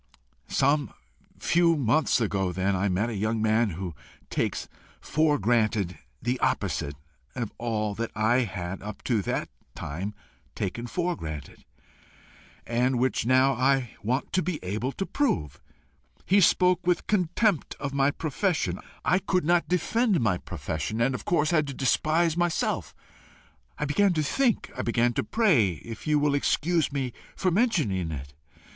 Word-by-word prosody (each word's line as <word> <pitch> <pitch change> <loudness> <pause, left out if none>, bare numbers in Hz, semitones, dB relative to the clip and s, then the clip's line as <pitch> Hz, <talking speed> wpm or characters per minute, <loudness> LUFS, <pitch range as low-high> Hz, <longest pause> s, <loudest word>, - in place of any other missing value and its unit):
"Some 140 -2 +2 0.5
few 170 -1 +3
months 135 +2 +2
ago 100 -5 0
then, 95 +2 0
I 100 +2 +1
met 105 +6 0
a - - -4
young 110 +3 0
man 110 +1 +2
who 90 0 -5 0.4
takes - - -1 0.3
for 155 -1 +2
granted 110 -6 +1 0.2
the 125 +1 -1
opposite 70 0 -1 0.4
of 120 -4 -4
all 110 -3 -1
that 115 +2 -3
I 110 +3 +3
had 95 -5 -3
up 105 +1 -8
to 115 -5 +1
that - - -2 0.3
time 95 +8 -5 0.4
taken 120 +5 -3
for 175 +5 -1
granted, 75 - -8 1.0
and 125 +2 +1
which 125 -2 0
now 130 +2 +5
I 130 -1 +1
want 125 +6 -2
to 185 - +3
be 180 -3 -2
able 110 +8 -2
to 195 - -3
prove. 75 - -1 0.6
He 200 +2 +4
spoke 180 0 +3
with 180 -1 +2
contempt 190 -1 +1
of 140 -1 -4
my 140 0 +3
profession. 160 +4 -1 0.3
I 185 - +4
could 185 -3 0
not 175 +1 +3
defend 205 +4 +2
my 105 -7 +1
profession, 80 +6 -4
and 125 +3 +2
of 125 - -5
course 155 -2 +2
had 155 -4 +2
to 140 - -5
despise 155 +6 +2
myself. 175 -1 -1 0.8
I 150 - -1
began 185 +7 +3
to 155 -2 0
think. 240 - +1
I - - -2
began 120 +1 +1
to - - 0
pray 140 - +3
if 115 - -9
you 150 -1 +3
will 145 -1 +2
excuse 155 +3 +1
me 135 -4 -2 0.2
for 185 - +1
mentioning 155 - +1
it. 70 -2 -7
130 Hz, 155 wpm, -27 LUFS, 105-165 Hz, 1.0 s, now